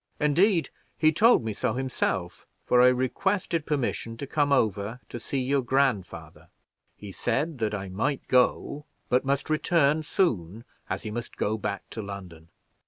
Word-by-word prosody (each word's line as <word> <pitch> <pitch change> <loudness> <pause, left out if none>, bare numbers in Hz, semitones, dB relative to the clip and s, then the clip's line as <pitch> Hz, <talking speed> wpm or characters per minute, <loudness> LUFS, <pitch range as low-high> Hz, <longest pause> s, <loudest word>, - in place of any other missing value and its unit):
Indeed, 165 +4 +3 0.3
he 155 -1 +4
told 225 - +5
me 110 - -2
so - - -1
himself, 105 -9 -2 0.2
for 125 - +4
I 125 - +7
requested 160 +7 0
permission 120 -5 -2
to 140 - -5
come 145 +1 0
over 110 -2 +1
to 120 - -6
see 135 - -4
your 135 +2 +1
grandfather. 125 -6 -1 0.5
He 100 -1 -9
said 135 - -1
that 105 -2 0
I 100 -1 -5
might 115 +10 -2
go, 130 +3 +1 0.2
but 125 +2 +2
must 140 0 0
return 155 -1 +2
soon, 115 - -1 0.3
as - - -3
he 110 - -5
must 120 +1 -6
go 105 - 0
back 100 -2 -4
to 110 - -5
London. 95 -5 -9
125 Hz, 160 wpm, -27 LUFS, 105-150 Hz, 0.5 s, I